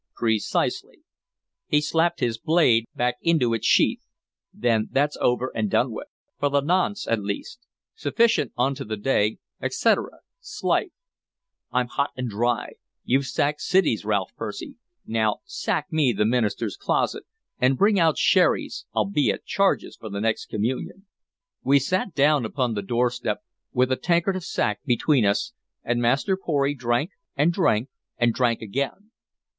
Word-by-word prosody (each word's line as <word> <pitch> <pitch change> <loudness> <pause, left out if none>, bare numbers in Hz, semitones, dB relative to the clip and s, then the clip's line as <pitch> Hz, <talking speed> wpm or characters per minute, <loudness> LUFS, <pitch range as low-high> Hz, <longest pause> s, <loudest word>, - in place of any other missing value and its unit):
"Precisely." 110 -3 -1 0.6
He 150 - +3
slapped 165 +3 0
his 115 -2 0
blade 125 -7 +3
back 125 0 0
into 155 -9 +2
its 115 - -1
sheath. - - +3 0.5
"Then 115 -3 0
that's 145 +2 +1
over 125 +1 +1
and 110 -2 -1
done - - +2
with, - - -7 0.3
for 145 - +1
the 140 0 +2
nonce 185 +6 0
at 115 -2 +1
least! 100 - -5 0.3
Sufficient 235 - +1
unto 130 +2 0
the 110 0 -4
day, 105 -1 +1 0.2
etcetera. - - 0 0.2
'S - - -9
life! 405 - +2 0.8
I'm 125 0 +1
hot 140 +3 -1
and 125 -1 -2
dry! 120 +2 -1 0.3
You've 135 +1 +1
sacked 150 +3 0
cities, 180 - +2
Ralph 100 -3 -1
Percy; 115 - -6 0.3
now 110 -2 0
sack - - -2
me 145 -6 +3
the 105 +1 +1
minister's 115 - 0
closet 405 - -1 0.3
and 130 +1 +3
bring 200 0 +4
out 160 -2 +4
his - - 0
sherris - - +2
I'll - - +2
be 175 -8 +1
at - - -2
charges 195 0 0
for 110 - -8
the 100 0 -4
next 110 +1 -1
communion." 125 - -3 0.6
We 140 +1 +5
sat 185 +9 0
us 190 - -16
down 145 -1 +4
upon 125 +1 -1
the 105 - -2
doorstep 120 +4 -1 0.3
with 125 +1 +1
a 130 - +2
tankard 175 +2 +1
of 185 - -4
sack 105 -10 -1
between 125 0 +2
us, 110 - 0 0.3
and 120 0 0
Master 135 - +2
Pory 145 -6 0
drank, 125 - -1 0.3
and 155 +5 +3
drank, 130 - +1 0.3
and 120 -1 +2
drank 120 -2 0
again. 140 - -4
130 Hz, 160 wpm, -24 LUFS, 115-160 Hz, 0.8 s, We